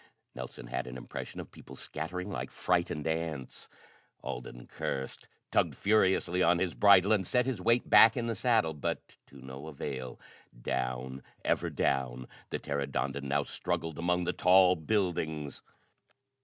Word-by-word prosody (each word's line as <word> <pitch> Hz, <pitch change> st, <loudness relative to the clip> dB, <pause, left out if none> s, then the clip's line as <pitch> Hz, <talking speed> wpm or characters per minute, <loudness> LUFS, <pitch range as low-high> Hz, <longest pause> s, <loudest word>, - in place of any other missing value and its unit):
Nelson 60 Hz, -1 st, -8 dB
had -, -, -4 dB
an 65 Hz, 0 st, -7 dB
impression 60 Hz, -, -7 dB
of -, -, -8 dB
people -, -, -12 dB
scattering 90 Hz, +2 st, -5 dB
like -, -, -4 dB
frightened 85 Hz, -4 st, 0 dB
ants. 80 Hz, -5 st, -3 dB, 0.5 s
Alden -, -, -6 dB
cursed, 65 Hz, 0 st, -5 dB, 0.2 s
tugged -, -, +2 dB
furiously 95 Hz, -3 st, +2 dB
on 90 Hz, -, +4 dB
the 90 Hz, -, +2 dB
bridle, 100 Hz, -1 st, +6 dB
and 95 Hz, -4 st, +1 dB
set 125 Hz, -1 st, +2 dB
his 130 Hz, -8 st, -2 dB
weight 115 Hz, +4 st, +2 dB
back 115 Hz, +2 st, +7 dB
in 120 Hz, -, -1 dB
the 115 Hz, -, -1 dB
saddle, 110 Hz, -8 st, +2 dB
but 75 Hz, -, -2 dB, 0.3 s
to 70 Hz, -, -15 dB
no 65 Hz, +3 st, -8 dB
avail. 70 Hz, -4 st, -6 dB, 0.4 s
Down! 65 Hz, +1 st, -3 dB, 0.2 s
Ever -, -, +1 dB
down! 65 Hz, -2 st, -1 dB, 0.2 s
The -, -, -2 dB
pteranodon 70 Hz, -1 st, -2 dB
now 70 Hz, +1 st, +1 dB
struggled 80 Hz, +2 st, -3 dB
among 90 Hz, +1 st, +1 dB
the 90 Hz, +1 st, -1 dB
tall 90 Hz, 0 st, +6 dB
buildings. 80 Hz, -5 st, -1 dB
80 Hz, 145 wpm, -31 LUFS, 65-95 Hz, 0.5 s, back